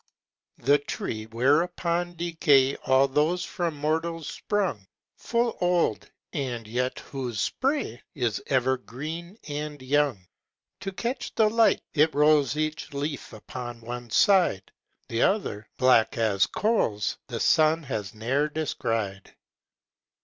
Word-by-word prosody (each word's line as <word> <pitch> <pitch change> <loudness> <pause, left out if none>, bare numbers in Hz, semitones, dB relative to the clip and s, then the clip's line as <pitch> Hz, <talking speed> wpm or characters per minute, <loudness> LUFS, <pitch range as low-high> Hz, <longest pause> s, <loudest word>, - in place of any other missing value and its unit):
The 145 +4 +3
tree 110 -6 -5
whereon 170 +8 +1
decay 150 -5 +3
All 130 +1 +5
those 155 +6 +1
from 170 -5 -2
mortals 160 +2 -1
sprung, 185 - -2 0.3
Full 235 0 0
old, 175 -10 +1 0.2
and 125 -6 -3
yet 125 +3 -1
whose 125 -6 -5
spray 265 - -1
Is 120 -6 -1
ever 130 -1 +2
green 160 - -7
and 150 0 -4
young; 130 -7 +1 0.5
To 195 - -4
catch 240 +7 -4
the 215 -1 +4
light, 230 0 +3
it 155 +1 +3
rolls 150 -2 +4
Each 155 0 -2
leaf 145 +1 -4
upon 120 +1 -8
one 120 +1 -6
side; 175 - +3 0.4
The 115 +1 -1
other, 150 - 0
black 125 -4 +4
as 105 -4 +2
coals, 160 - 0
The - - -4
sun 160 +1 +4
has 110 -7 -4
ne'er 135 +7 0
descried. 115 -10 -3
145 Hz, 120 wpm, -26 LUFS, 120-170 Hz, 0.5 s, All